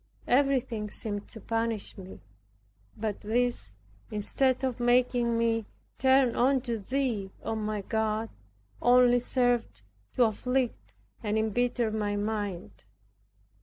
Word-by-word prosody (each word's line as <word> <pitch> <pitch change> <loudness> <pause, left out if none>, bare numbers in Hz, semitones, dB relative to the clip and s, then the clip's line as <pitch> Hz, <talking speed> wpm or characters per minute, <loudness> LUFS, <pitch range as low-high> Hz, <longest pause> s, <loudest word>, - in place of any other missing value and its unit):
Everything 250 -5 +1
seemed 205 -1 -4
to 225 - -10
punish 225 0 -2
me, 190 -1 -11 0.8
but 215 -2 -3
this 235 - 0 0.4
instead 255 +5 0
of 255 -3 -1
making 240 -1 +2
me 225 -2 +1 0.3
turn 260 -2 +4
unto 250 -2 +1
Thee, 230 -3 -1
O - - -2
my 215 -1 -2
God, 220 +1 -1 0.5
only 245 0 +5
served 245 - 0 0.3
to 250 - +5
afflict 230 - -1 0.3
and 210 0 -1
embitter 235 +1 0
my 210 -1 -1
mind. 205 - -4
230 Hz, 110 wpm, -29 LUFS, 210-245 Hz, 0.8 s, only